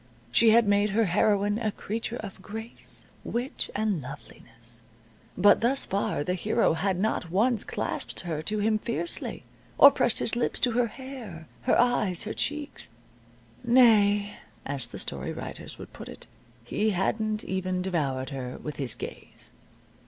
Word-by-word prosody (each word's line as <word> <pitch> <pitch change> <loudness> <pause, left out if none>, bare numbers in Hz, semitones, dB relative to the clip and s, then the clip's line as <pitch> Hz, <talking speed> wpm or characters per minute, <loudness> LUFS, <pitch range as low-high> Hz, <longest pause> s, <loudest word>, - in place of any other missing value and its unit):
She 230 - +5
had 225 0 +5
made 205 +1 +3
her 225 - +4
heroine 205 +3 +2
a 220 -2 0
creature 225 +3 -4
of 200 -5 -8
grace, 220 +4 -6 0.2
wit, 245 +3 -3
and 205 -6 0
loveliness, 115 -2 -12 0.6
but 205 +2 +6
thus 265 +4 +2
far 195 -6 -1
the 180 - -1
hero 180 - +2
had 180 +2 0
not 195 -4 -1
once 220 +5 +2
clasped - - -3
her 160 -4 -3
to 210 +7 -2
him 215 +1 +2
fiercely, 245 +10 -3 0.3
or 280 - +10
pressed 240 -4 +2
his 230 - +7
lips 240 - 0
to 245 - +3
her 240 +1 +2
hair, 235 -10 -9 0.2
her - - +3
eyes, 220 -7 +2
her 215 - -4
cheeks. 295 0 -3 0.7
Nay 210 -4 +4 0.3
(as 135 -4 -1
the - - -9
story - - -3
writers - - -7
would - - -11
put - - -9
it), - - -9 0.4
he 210 - 0
hadn't 215 +2 0
even 185 -1 -2
devoured 140 -8 -1
her 130 -2 -5
with 150 - -7
his 135 -5 -2
gaze. - - -4
205 Hz, 155 wpm, -27 LUFS, 175-230 Hz, 0.7 s, or